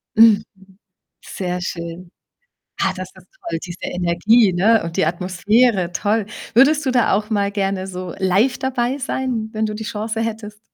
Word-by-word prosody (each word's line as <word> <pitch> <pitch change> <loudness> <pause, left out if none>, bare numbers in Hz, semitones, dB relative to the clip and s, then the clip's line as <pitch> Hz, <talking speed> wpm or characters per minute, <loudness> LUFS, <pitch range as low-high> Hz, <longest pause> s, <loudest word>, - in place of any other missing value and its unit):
Mhm, 220 -1 +6 0.8
sehr 180 -1 -4
schön. 170 0 -6 0.7
Ah, 190 - +2
das 185 0 -6
ist 185 -1 -17 0.2
toll, 165 -1 -2
diese 180 0 -8
Energie, 185 +5 +3
ne, 210 +5 +3
und 165 0 -6
die - - +3
Atmosphäre, 185 +3 +1
toll. 210 +2 0 0.3
Würdest 290 +5 +5
du 260 - +1
da 245 -2 +2
auch 210 +3 0
mal 200 -1 0
gerne 195 -2 -1
so 185 -2 -6
live 195 +7 +2
dabei 260 +1 -1
sein, 250 -4 -3
wenn 220 0 -1
du 215 - -4
die 220 +1 -6
Chance 220 +2 -3
hättest? 215 -2 -5
210 Hz, 160 wpm, -20 LUFS, 180-225 Hz, 0.8 s, Mhm